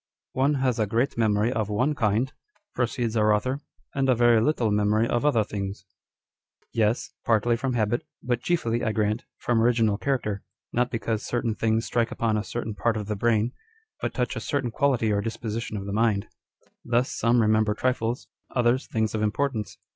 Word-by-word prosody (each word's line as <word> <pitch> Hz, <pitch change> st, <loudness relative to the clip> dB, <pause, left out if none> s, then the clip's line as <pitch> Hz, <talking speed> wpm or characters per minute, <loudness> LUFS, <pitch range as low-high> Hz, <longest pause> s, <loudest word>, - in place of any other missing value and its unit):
" -, -, -67 dB
One 145 Hz, +2 st, +3 dB
has 130 Hz, -3 st, 0 dB
a 110 Hz, -, +2 dB
great 115 Hz, +6 st, 0 dB
memory 110 Hz, +1 st, +2 dB
of 110 Hz, -4 st, -1 dB
one 125 Hz, +8 st, +1 dB
kind," 115 Hz, +1 st, +1 dB, 0.4 s
proceeds 120 Hz, -2 st, -1 dB
our 110 Hz, -1 st, +4 dB
author, 130 Hz, +6 st, +1 dB, 0.2 s
" -, -, -40 dB
and 135 Hz, -1 st, +1 dB
a 130 Hz, -, +5 dB
very 120 Hz, -1 st, +5 dB
little 115 Hz, -4 st, +1 dB
memory 105 Hz, +2 st, +2 dB
of 120 Hz, +2 st, 0 dB
other 135 Hz, -7 st, +3 dB
things." 100 Hz, -1 st, -5 dB, 0.9 s
Yes, 110 Hz, 0 st, +1 dB
partly 115 Hz, +1 st, +3 dB
from 125 Hz, +2 st, -2 dB
habit, 120 Hz, 0 st, 0 dB, 0.2 s
but 120 Hz, -1 st, 0 dB
chiefly, 120 Hz, -9 st, 0 dB
I 110 Hz, -, 0 dB
grant, 110 Hz, +2 st, 0 dB
from 120 Hz, -2 st, +1 dB
original 115 Hz, -3 st, +3 dB
character; 110 Hz, -8 st, -1 dB, 0.3 s
not 125 Hz, +1 st, +2 dB
because 115 Hz, -2 st, -2 dB
certain 120 Hz, -2 st, -1 dB
things 110 Hz, +1 st, 0 dB
strike 115 Hz, 0 st, +1 dB
upon 115 Hz, -2 st, 0 dB
a 105 Hz, -, 0 dB
certain 115 Hz, -1 st, -4 dB
part 115 Hz, +2 st, 0 dB
of 105 Hz, -, -3 dB
the 105 Hz, +1 st, -2 dB
brain, 115 Hz, +2 st, +2 dB, 0.5 s
but -, -, -1 dB
touch -, -, -1 dB
a -, -, -2 dB
certain 135 Hz, -5 st, -1 dB
quality 125 Hz, -4 st, +2 dB
or 100 Hz, -1 st, +1 dB
disposition 115 Hz, 0 st, -4 dB
of 100 Hz, -, -5 dB
the 100 Hz, -, -4 dB
mind. 105 Hz, -2 st, +1 dB, 0.6 s
Thus, 120 Hz, +2 st, +1 dB
some 115 Hz, +2 st, +2 dB
remember 110 Hz, -1 st, +3 dB
trifles, 125 Hz, 0 st, -1 dB, 0.3 s
others 125 Hz, +1 st, +2 dB
things 110 Hz, -1 st, -1 dB
of 110 Hz, -, -1 dB
importance. 110 Hz, 0 st, -1 dB
115 Hz, 185 wpm, -26 LUFS, 110-120 Hz, 0.9 s, a